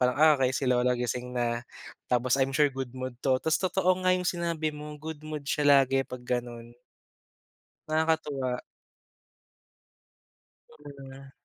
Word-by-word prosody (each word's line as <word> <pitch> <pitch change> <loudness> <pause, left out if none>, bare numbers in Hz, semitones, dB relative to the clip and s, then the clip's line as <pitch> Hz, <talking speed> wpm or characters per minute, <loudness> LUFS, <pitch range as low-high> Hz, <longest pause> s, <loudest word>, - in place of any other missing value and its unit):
Parang, 125 0 +2
"Ah, 155 0 +7
okey, 130 -1 +2
si - - -2
lola 125 0 +3
gising 125 +1 -3
na." 120 -1 0 0.5
Tapos 125 +1 +2
I'm 135 +1 +1
sure 150 0 +5
good 130 -2 -5
mood 130 -1 -5
'to. 130 -1 +2
Tas 160 - +2
totoo 185 0 +2
nga 185 - +5
'yong 180 - -4
sinabi 170 -3 -1
mo. 150 0 -8
Good 160 -1 -7
mood 155 -2 -5
siya 150 - 0 0.2
lagi 135 +1 +1
'pag 125 -1 -8
gano'n. 120 -1 -4 1.2
Nakakatuwa. 150 -5 0 2.1
Mm. 135 -2 -12
135 Hz, 140 wpm, -28 LUFS, 125-155 Hz, 2.1 s, Ah